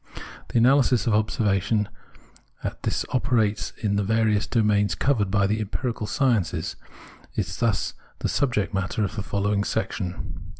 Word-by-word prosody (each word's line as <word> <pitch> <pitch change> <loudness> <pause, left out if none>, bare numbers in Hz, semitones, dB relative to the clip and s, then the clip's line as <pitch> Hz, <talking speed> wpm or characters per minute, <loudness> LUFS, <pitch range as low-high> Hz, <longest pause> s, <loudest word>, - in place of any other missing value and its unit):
The - - -1
analysis 125 0 +4
of 115 - +2
observation 105 -1 +1 0.8
as - - -2
this - - -1
operates 110 -5 +1
in 100 -1 +1
the 100 - +1
various 110 0 +2
domains 105 -3 +2
covered 115 -9 +1
by 100 0 +3
the 105 +3 0
empirical 110 +1 -3
sciences 115 - 0 0.6
is 90 -4 -2
thus 115 -4 0 0.2
the - - -1
subject 120 -8 0
matter 95 +2 -1
of 100 - -2
the 105 - -2
following 100 +1 0
section. 95 -4 -3
105 Hz, 140 wpm, -25 LUFS, 100-115 Hz, 0.8 s, analysis